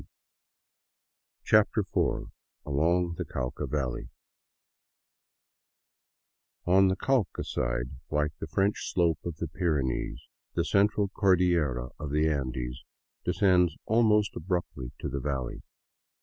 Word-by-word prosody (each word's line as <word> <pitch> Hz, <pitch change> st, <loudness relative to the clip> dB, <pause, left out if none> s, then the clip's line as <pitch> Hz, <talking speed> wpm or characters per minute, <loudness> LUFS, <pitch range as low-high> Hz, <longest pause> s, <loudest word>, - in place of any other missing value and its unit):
02 -, -, -19 dB, 1.4 s
CHAPTER 110 Hz, +1 st, +4 dB
IV 95 Hz, -, -1 dB, 0.3 s
ALONG 85 Hz, +5 st, +1 dB
THE -, -, -1 dB
CAUCA 65 Hz, -1 st, -3 dB
VALLEY 65 Hz, -5 st, -2 dB, 2.6 s
ON 95 Hz, +2 st, +5 dB
the 95 Hz, -, +2 dB
Cauca 130 Hz, -4 st, 0 dB
side, -, -, -2 dB, 0.2 s
like 75 Hz, 0 st, +1 dB
the -, -, -5 dB
French 100 Hz, +1 st, 0 dB
slope 85 Hz, -4 st, +2 dB
of 85 Hz, -2 st, -4 dB
the 85 Hz, -, -4 dB
Pyrenees, 75 Hz, -6 st, -1 dB, 0.4 s
the 85 Hz, -, +1 dB
Central 100 Hz, +1 st, +2 dB
Cordillera 85 Hz, -, +2 dB
of 75 Hz, -, -4 dB
the 75 Hz, +2 st, +2 dB
Andes 65 Hz, -4 st, -2 dB, 0.4 s
descends 90 Hz, -5 st, +3 dB
almost 110 Hz, -2 st, +3 dB
abruptly 85 Hz, -8 st, -3 dB
to -, -, -4 dB
the 70 Hz, -, -3 dB
valley. 65 Hz, -2 st, -3 dB
85 Hz, 110 wpm, -29 LUFS, 70-95 Hz, 2.6 s, ON